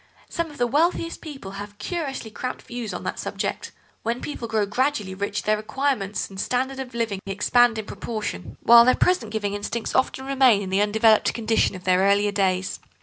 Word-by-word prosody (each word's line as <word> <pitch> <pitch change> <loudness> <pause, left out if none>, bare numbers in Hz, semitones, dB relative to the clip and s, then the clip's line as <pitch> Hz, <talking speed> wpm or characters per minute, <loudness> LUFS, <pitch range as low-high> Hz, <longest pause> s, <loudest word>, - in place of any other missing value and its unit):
Some 335 -2 -2
of 295 - -13
the 245 - +2
wealthiest 330 +6 0
people 275 - -8
have 205 +1 -8
curiously 280 - -4
cramped 255 +4 -5
views 240 -3 -5
on 180 - -6
that - - -4
subject. - - -3 0.3
When 235 +2 -2
people 245 -5 -5
grow 220 -2 +1
gradually 210 -2 -1
rich 200 +1 -3
their 215 - +2
requirements 215 -2 -1
and 190 -1 -10
standard 260 +4 -1
of 255 -2 -7
living 225 -4 -1
expand 225 +4 +3
in 220 - -4
proportion, 210 - -5
while 235 0 +9
their 255 +1 +4
present 255 -13 +1
giving 205 -2 -2
instincts 210 +3 -3
often 265 0 0
remain 260 -6 +4
in 190 - -6
the 195 +1 +2
undeveloped 215 +1 +3
condition 225 -3 +1
of 180 - -9
their 185 0 +3
earlier 200 +1 +3
days. 190 -2 0
220 Hz, 190 wpm, -24 LUFS, 200-255 Hz, 0.3 s, while